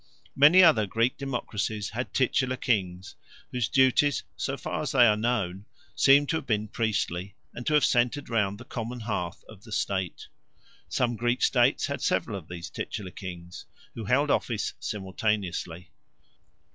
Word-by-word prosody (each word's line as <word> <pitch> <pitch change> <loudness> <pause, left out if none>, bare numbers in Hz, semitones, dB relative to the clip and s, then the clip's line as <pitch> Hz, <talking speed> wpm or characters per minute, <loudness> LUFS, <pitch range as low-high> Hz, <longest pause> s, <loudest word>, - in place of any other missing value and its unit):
Many 155 +7 +7
other 115 - +5
Greek 115 +5 +1
democracies 110 -6 -3
had 120 +3 -4
titular 130 -1 +1
kings, 95 -7 -1 0.4
whose 125 -4 -1
duties, 135 +2 +3
so 135 0 -3
far - - -4
as 150 - -3
they 125 -3 +7
are 105 -2 +5
known, 105 -4 -1 0.3
seem 140 +1 +5
to 160 - 0
have 140 - -7
been 105 -2 0
priestly, 100 -4 -2 0.2
and 120 - -8
to 150 - +3
have 150 - +5
centered 125 +4 +1
round 105 -4 0
the 125 - -12
Common 120 +1 -5
Hearth 95 -5 -4
of 105 -2 -14
the 110 - -13
state. 95 -3 -2 0.6
Some 120 -1 0
Greek 120 +2 0
states 125 +2 +3
had 140 -3 -4
several 110 - 0
of 90 -5 -8
these 85 +1 -7
titular 100 -4 -5
kings, 90 -2 -9 0.3
who 115 - -6
held 140 +7 +2
office 115 -4 -1
simultaneously. 95 -4 -3
115 Hz, 160 wpm, -27 LUFS, 100-130 Hz, 0.6 s, Many